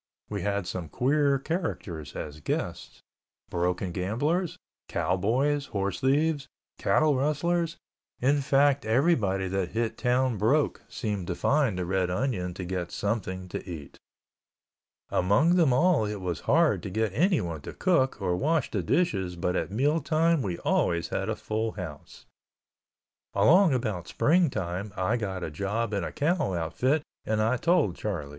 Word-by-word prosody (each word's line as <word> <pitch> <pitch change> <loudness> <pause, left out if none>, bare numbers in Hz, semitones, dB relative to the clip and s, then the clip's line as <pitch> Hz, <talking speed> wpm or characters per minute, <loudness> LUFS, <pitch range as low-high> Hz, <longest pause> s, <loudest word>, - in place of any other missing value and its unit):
We 100 -2 -2
had 100 0 -1
some 90 -2 -5
queer 140 - +2
characters 120 - -4
as 75 0 -6
guests. 75 - -4 0.5
Broken 90 +1 -1
gamblers, 145 - -1 0.3
cowboys, 130 +11 0
horse 100 -2 -2
thieves, 145 +1 +1 0.3
cattle 155 -2 +3
rustlers, 165 +5 0 0.4
in 140 +3 +2
fact, 140 +1 +3
everybody 110 - +2
that 95 -1 -2
hit 115 -1 -1
town 125 -2 +1
broke 140 +9 +2
seemed 105 -6 -3
to 90 - -2
find 140 -7 +2
the 90 - -2
Red 95 0 0
Onion 90 -4 -1
to 95 - -5
get 90 -1 -3
something 95 -3 -2
to - - -5
eat. 75 -5 -8 1.1
Among 105 - +3
them 165 -6 +4
all 155 -1 +3
it 105 -1 -4
was 90 -4 -3
hard 165 +1 +4
to 100 - -5
get 110 +1 -1
anyone 120 - +1
to - - -7
cook 135 -11 +1
or 90 -3 0
wash 155 - 0
the 100 - 0
dishes 95 - 0
but 90 +1 -1
at - - -1
meal 140 +10 +1
time 160 +1 +2
we 90 -7 -2
always 85 0 0
had - - -2
a - - 0
full 110 +1 -2
house. 85 -8 -9 1.1
Along 180 +2 +6
about 110 -9 -2
spring 170 +1 +3
time 95 -1 -4
I 95 +5 +1
got 95 -5 -4
a 80 - -4
job 105 +7 -2
in 100 -3 0
a - - -4
cow 150 - 0
outfit 130 - 0 0.2
and 110 0 -1
I 115 +4 +2
told 160 - +2
Charlie. 85 -9 -4
110 Hz, 155 wpm, -27 LUFS, 90-145 Hz, 1.1 s, Along